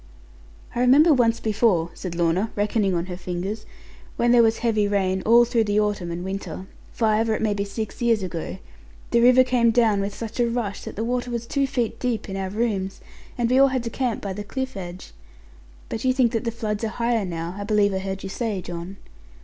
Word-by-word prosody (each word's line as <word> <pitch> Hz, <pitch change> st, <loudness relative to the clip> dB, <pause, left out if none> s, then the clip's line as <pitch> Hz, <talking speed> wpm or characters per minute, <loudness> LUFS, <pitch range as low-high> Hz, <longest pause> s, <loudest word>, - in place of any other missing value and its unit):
'I -, -, -3 dB
remember 280 Hz, +6 st, +6 dB
once 230 Hz, -3 st, +2 dB
before,' 210 Hz, -6 st, +1 dB
said 180 Hz, -3 st, -6 dB
Lorna, 175 Hz, +5 st, +1 dB
reckoning 205 Hz, -2 st, +1 dB
on 170 Hz, 0 st, -1 dB
her 180 Hz, -1 st, -6 dB
fingers, 185 Hz, +4 st, -5 dB, 0.5 s
'when 240 Hz, 0 st, +2 dB
there 240 Hz, -1 st, +7 dB
was 225 Hz, -1 st, +3 dB
heavy 215 Hz, -3 st, +1 dB
rain, 190 Hz, -2 st, 0 dB
all 235 Hz, +1 st, +7 dB
through 230 Hz, -1 st, +1 dB
the 205 Hz, 0 st, +1 dB
autumn 205 Hz, -4 st, -1 dB
and 170 Hz, +1 st, -4 dB
winter, 190 Hz, 0 st, -5 dB, 0.3 s
five 220 Hz, 0 st, +1 dB
or 220 Hz, -, +2 dB
it -, -, -4 dB
may 215 Hz, -1 st, +2 dB
be 200 Hz, 0 st, -1 dB
six 210 Hz, +3 st, -6 dB
years 230 Hz, -4 st, +2 dB
ago, 165 Hz, -, -5 dB, 0.5 s
the 235 Hz, -, +4 dB
river 250 Hz, +1 st, +7 dB
came 245 Hz, -2 st, +2 dB
down 225 Hz, -3 st, +3 dB
with 200 Hz, +1 st, -2 dB
such 230 Hz, +1 st, -7 dB
a 240 Hz, -1 st, +3 dB
rush 230 Hz, -4 st, -3 dB
that -, -, -7 dB
the 220 Hz, -, -2 dB
water 245 Hz, +1 st, -1 dB
was 235 Hz, -1 st, -3 dB
two 275 Hz, +3 st, 0 dB
feet 245 Hz, -5 st, -2 dB
deep 245 Hz, -3 st, -2 dB
in 195 Hz, -, -5 dB
our 190 Hz, -1 st, -3 dB
rooms, 200 Hz, -3 st, -2 dB, 0.4 s
and 240 Hz, -1 st, +1 dB
we 260 Hz, -, +5 dB
all 275 Hz, -, +7 dB
had 260 Hz, -2 st, -1 dB
to 230 Hz, -, -4 dB
camp 250 Hz, -3 st, -2 dB
by 200 Hz, -2 st, -3 dB
the 205 Hz, +2 st, -5 dB
cliff 260 Hz, +4 st, -4 dB
edge. 180 Hz, -1 st, -8 dB, 0.8 s
But 225 Hz, -, -5 dB
you 260 Hz, 0 st, +3 dB
think 255 Hz, -3 st, +3 dB
that 230 Hz, +1 st, -2 dB
the 230 Hz, -, 0 dB
floods 220 Hz, -2 st, -3 dB
are -, -, +1 dB
higher 235 Hz, 0 st, 0 dB
now, 170 Hz, -1 st, -4 dB
I -, -, -3 dB
believe 205 Hz, -1 st, +2 dB
I 190 Hz, -, -1 dB
heard 190 Hz, 0 st, -5 dB
you 195 Hz, -, -5 dB
say, 215 Hz, -1 st, -2 dB
John.' 175 Hz, +2 st, -7 dB
215 Hz, 225 wpm, -24 LUFS, 195-235 Hz, 0.8 s, there